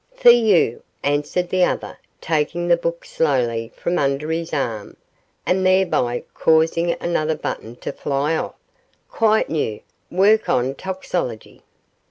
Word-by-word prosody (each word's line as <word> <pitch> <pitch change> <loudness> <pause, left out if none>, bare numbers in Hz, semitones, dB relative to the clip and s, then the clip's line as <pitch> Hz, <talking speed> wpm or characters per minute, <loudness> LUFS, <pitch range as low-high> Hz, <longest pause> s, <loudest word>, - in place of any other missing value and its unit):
'For 245 - +7
you,' 215 - +3 0.2
answered 145 +5 0
the 185 0 +2
other, - - -2 0.2
taking 165 +2 -1
the 170 - +5
book 170 0 -4
slowly 120 -7 0
from 175 - -1
under 140 +2 0
his 165 +1 -3
arm, 115 -8 -3 0.5
and 185 +1 +1
thereby 185 -10 +2
causing 165 +2 +2
another 160 -2 0
button 120 -5 -5
to - - -6
fly 145 +3 -1
off, - - -3 0.5
'quite 220 -1 +2
new, 145 -9 -1 0.3
work 205 +4 +3
on 130 +2 +1
toxicology. 180 - -5
160 Hz, 130 wpm, -21 LUFS, 140-180 Hz, 0.5 s, For